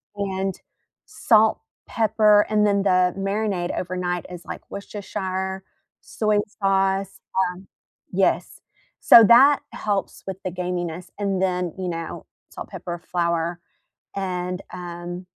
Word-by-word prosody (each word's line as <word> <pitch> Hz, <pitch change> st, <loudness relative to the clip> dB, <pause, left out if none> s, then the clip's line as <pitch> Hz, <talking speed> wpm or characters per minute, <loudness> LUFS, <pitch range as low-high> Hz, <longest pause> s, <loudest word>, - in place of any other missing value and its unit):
and 195 Hz, -2 st, -2 dB, 0.5 s
salt, 220 Hz, -1 st, +3 dB, 0.3 s
pepper 215 Hz, -2 st, +4 dB
and 210 Hz, -1 st, +3 dB
then 200 Hz, -1 st, +2 dB
the 180 Hz, -2 st, +3 dB
marinade 195 Hz, -2 st, -1 dB
overnight 180 Hz, -1 st, -2 dB
is 175 Hz, -1 st, -9 dB
like -, -, -7 dB
Worcestershire, 190 Hz, -1 st, -4 dB, 0.4 s
soy 215 Hz, -1 st, 0 dB, 0.2 s
sauce, 195 Hz, 0 st, +1 dB, 0.3 s
um 185 Hz, +2 st, -14 dB, 0.5 s
yes, -, -, 0 dB, 0.4 s
so 230 Hz, -, +9 dB
that 265 Hz, +6 st, +7 dB
helps 200 Hz, -2 st, -3 dB
with 190 Hz, -1 st, -4 dB
the 185 Hz, -, -2 dB
gaminess 175 Hz, -1 st, -4 dB
and, 195 Hz, -2 st, -1 dB
then, 180 Hz, -3 st, 0 dB
you 185 Hz, -1 st, -2 dB
know, 165 Hz, -1 st, -5 dB, 0.2 s
salt, -, -, -9 dB
pepper, 175 Hz, -1 st, -6 dB
flour 170 Hz, -1 st, -1 dB, 0.6 s
and, 180 Hz, -1 st, -3 dB
um, 175 Hz, 0 st, -7 dB
190 Hz, 115 wpm, -23 LUFS, 180-200 Hz, 0.6 s, so